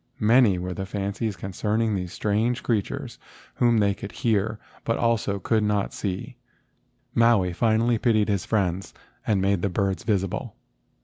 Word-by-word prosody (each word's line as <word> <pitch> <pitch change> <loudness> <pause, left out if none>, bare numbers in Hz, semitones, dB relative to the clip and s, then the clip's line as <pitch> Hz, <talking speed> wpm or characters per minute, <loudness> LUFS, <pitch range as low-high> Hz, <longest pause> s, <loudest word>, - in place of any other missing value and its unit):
Many 110 -3 +5
were 90 +1 -4
the 95 +1 -5
fancies 100 +2 -3
concerning 105 +4 -1
these 90 -3 -3
strange 110 +5 0
creatures 110 -5 -2 0.3
whom 120 -1 +3
they 100 -2 +3
could 100 +1 -8
hear 110 -1 0 0.3
but 115 - 0 0.5
could 110 -2 +2
not 105 -1 0
see. 95 -3 -4 0.8
Maui 115 -6 +3
finally 115 +3 +2
pitied 110 -3 +2
his 100 -4 0
friends 95 -3 -1 0.3
and 105 -3 +2
made 100 -2 +2
the 100 - 0
birds 95 0 -1
visible. 100 -4 -1
105 Hz, 140 wpm, -25 LUFS, 95-115 Hz, 0.8 s, Many